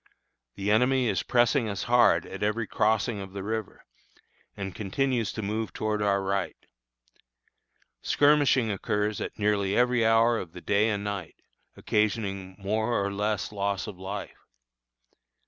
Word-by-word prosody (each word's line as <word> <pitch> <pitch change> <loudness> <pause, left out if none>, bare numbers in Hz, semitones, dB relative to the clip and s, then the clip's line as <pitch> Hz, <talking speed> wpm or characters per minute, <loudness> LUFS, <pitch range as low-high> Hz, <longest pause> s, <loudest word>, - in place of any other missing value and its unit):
The 100 +1 -1
enemy 125 +3 +3
is 95 - 0
pressing 120 -1 +2
us 100 -1 -3
hard 120 0 +4
at 95 - -8
every 105 +2 0
crossing 110 +1 0
of 95 -1 -9
the 100 -1 -5
river, 110 0 -5 0.7
and 95 -2 -5
continues 115 +3 -1
to 110 - -5
move 110 +2 -3
towards 110 -1 -2
our 100 -1 +1
right. 95 -3 -1 1.5
Skirmishing 145 -5 +3
occurs 105 +1 -1
at - - -5
nearly 100 -2 +1
every 125 -1 +3
hour 115 +1 +4
of 85 -3 -8
the 90 - -9
day 100 +4 +2
and 100 -2 -2
night, 100 -5 -5 0.4
occasioning 100 -3 -1
more 110 +4 0
or 100 0 -1
less 105 -1 -1
loss 100 -1 -2
of 100 -4 -9
life. 100 +2 -7
105 Hz, 145 wpm, -27 LUFS, 100-115 Hz, 1.5 s, hard